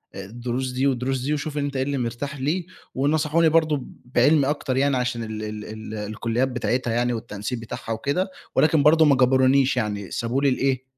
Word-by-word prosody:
الدروس 120 Hz, +6 st, -4 dB
دي 130 Hz, +2 st, +1 dB
والدروس 130 Hz, 0 st, -1 dB
دي 140 Hz, +4 st, -1 dB
وشوف 150 Hz, 0 st, -3 dB
أنت 140 Hz, -1 st, -2 dB
إيه 130 Hz, -, +1 dB
اللي 140 Hz, +1 st, -2 dB
مرتاح 125 Hz, +3 st, -4 dB
ليه." 160 Hz, +7 st, -1 dB, 0.3 s
ونَصَحوني 155 Hz, +4 st, +2 dB
برضه 155 Hz, -4 st, +2 dB, 0.2 s
بعِلمي 135 Hz, +4 st, +3 dB
أكتر 135 Hz, -3 st, -1 dB
يعني 140 Hz, 0 st, +2 dB
عشان 125 Hz, -2 st, -2 dB
ال 110 Hz, -1 st, -5 dB
ال 105 Hz, 0 st, -6 dB
ال 110 Hz, 0 st, -8 dB
الكُلّيات 110 Hz, +4 st, -1 dB
بتاعتها 125 Hz, -1 st, -1 dB
يعني 120 Hz, +1 st, +1 dB
والتنسيق 110 Hz, +1 st, -5 dB
بتاعها 115 Hz, 0 st, -7 dB
وكده، 140 Hz, -, -1 dB, 0.3 s
ولكن 155 Hz, -1 st, +4 dB
برضه 160 Hz, +2 st, +6 dB
ما 145 Hz, -2 st, +5 dB
جبرونيش، 130 Hz, +1 st, +3 dB
يعني 105 Hz, -4 st, -2 dB
سابوا 120 Hz, +3 st, -1 dB
لي 140 Hz, -, +4 dB
الإيه 130 Hz, 0 st, 0 dB
130 Hz, 180 wpm, -23 LUFS, 115-140 Hz, 0.3 s, برضه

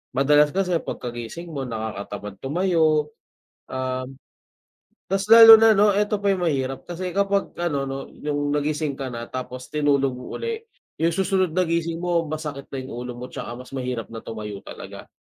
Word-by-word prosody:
madalas 145 Hz, +2 st, +5 dB
kasi 180 Hz, -2 st, +1 dB
pagkagising 120 Hz, +7 st, -6 dB
mo 140 Hz, -3 st, -4 dB
nakakatamad 105 Hz, -3 st, -5 dB
tumayo. 155 Hz, -1 st, +2 dB, 0.6 s
Um, 130 Hz, 0 st, -3 dB, 1.0 s
ta's 195 Hz, 0 st, 0 dB
lalo 225 Hz, -1 st, +12 dB
na 225 Hz, 0 st, +7 dB
'no 205 Hz, +1 st, +5 dB
eto 210 Hz, 0 st, +1 dB
pa 200 Hz, -, +2 dB
yung 185 Hz, -2 st, -1 dB
mahirap 135 Hz, -3 st, -1 dB
kasi 180 Hz, +1 st, -4 dB
kapag 200 Hz, 0 st, +1 dB
ano 150 Hz, -5 st, 0 dB
'no 135 Hz, -, -3 dB, 0.3 s
yung 145 Hz, -1 st, -1 dB
nagising 150 Hz, 0 st, -1 dB
ka 135 Hz, -1 st, -5 dB
na 115 Hz, 0 st, -6 dB
tapos 130 Hz, 0 st, -6 dB
tinulog 140 Hz, -3 st, +1 dB
mo 125 Hz, 0 st, -8 dB
uli, 460 Hz, -1 st, -3 dB, 0.4 s
yung 165 Hz, +1 st, +2 dB
susunod 190 Hz, -1 st, +1 dB
na 185 Hz, -, +2 dB
gising 165 Hz, 0 st, -1 dB
mo 175 Hz, -1 st, +1 dB
masakit 150 Hz, -2 st, -5 dB
na 135 Hz, -, -4 dB
yung -, -, -8 dB
ulo 125 Hz, 0 st, -5 dB
mo 125 Hz, -, -6 dB
'tsaka -, -, -7 dB
mas 125 Hz, -, -12 dB
mahirap 125 Hz, -3 st, -3 dB
na 115 Hz, -1 st, -9 dB
tumayo 105 Hz, -3 st, -7 dB
talaga. -, -, -10 dB
150 Hz, 170 wpm, -23 LUFS, 130-180 Hz, 1.0 s, lalo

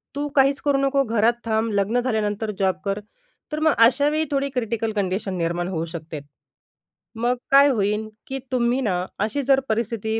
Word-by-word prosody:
"तू 290 Hz, +1 st, -2 dB
काहीच 275 Hz, 0 st, +4 dB
करू 285 Hz, -2 st, +2 dB
नको. 275 Hz, 0 st, +2 dB
घरात 230 Hz, -1 st, +2 dB
थांब. 220 Hz, 0 st, 0 dB
लग्न 205 Hz, +4 st, +1 dB
झाल्यानंतर 220 Hz, -3 st, -1 dB
जॉब 190 Hz, -1 st, +2 dB
कर." 200 Hz, +1 st, -1 dB, 0.5 s
तर 305 Hz, -, -2 dB
मग 315 Hz, 0 st, +4 dB
अशावेळी 295 Hz, +6 st, +2 dB
थोडी 280 Hz, 0 st, 0 dB
क्रिटिकल 230 Hz, -3 st, -2 dB
कंडिशन 195 Hz, 0 st, -1 dB
निर्माण 170 Hz, +1 st, -1 dB
होऊ 165 Hz, -3 st, -2 dB
शकते. 160 Hz, -2 st, -7 dB, 1.0 s
मग 240 Hz, +2 st, 0 dB, 0.2 s
काय 280 Hz, +1 st, +7 dB
होईन 210 Hz, -2 st, 0 dB, 0.2 s
की 270 Hz, 0 st, -4 dB
तुम्ही 250 Hz, +1 st, +1 dB
ना 180 Hz, -7 st, -1 dB
अशी 220 Hz, +7 st, -1 dB
जर 270 Hz, 0 st, +4 dB
परिस्थिती 220 Hz, 0 st, -1 dB
225 Hz, 165 wpm, -23 LUFS, 200-270 Hz, 1.0 s, काय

